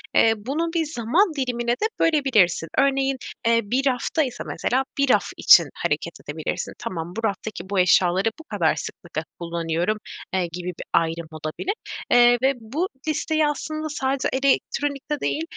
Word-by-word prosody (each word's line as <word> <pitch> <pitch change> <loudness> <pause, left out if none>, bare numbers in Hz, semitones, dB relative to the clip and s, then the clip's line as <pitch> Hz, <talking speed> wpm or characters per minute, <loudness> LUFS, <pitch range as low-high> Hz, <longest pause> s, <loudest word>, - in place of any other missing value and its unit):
eee, 225 - +6
bunu 300 +10 -2
bir 330 -2 +1
zaman 310 - +1
dilimine 245 -3 -1
de 245 - 0
bölebilirsin. 250 - +3
Örneğin, 270 -1 +2 0.3
eee, 230 0 +4
bir 255 +7 0
rafta 265 +5 +1
ise 250 -3 -5
mesela, 260 +2 0
bir 280 -1 +2
raf - - +4
için - - +8
hareket - - -2
edebilirsin, - - -4
“Tamam, 170 -1 -5
bu 225 - -4
raftaki 200 -1 -5
bu 200 -1 +1
eşyaları 180 +2 +4
bu - - -10
kadar 200 - +1
sıklıkla 165 -2 -6 0.2
kullanıyorum.” 170 +3 -1 0.4
eee, 185 -2 +1
gibi 180 +1 -6
bir 180 - -6
ayrım 165 0 +1
olabilir. 155 - -3 0.4
Eee, 245 0 +6
ve 265 +1 +3
bu 300 +12 -2 0.2
listeyi 310 0 +1
aslında 310 +1 -3
sadece 270 -2 -1
elektronikte 275 +2 0
değil, 310 - -1
245 Hz, 155 wpm, -23 LUFS, 185-285 Hz, 0.4 s, için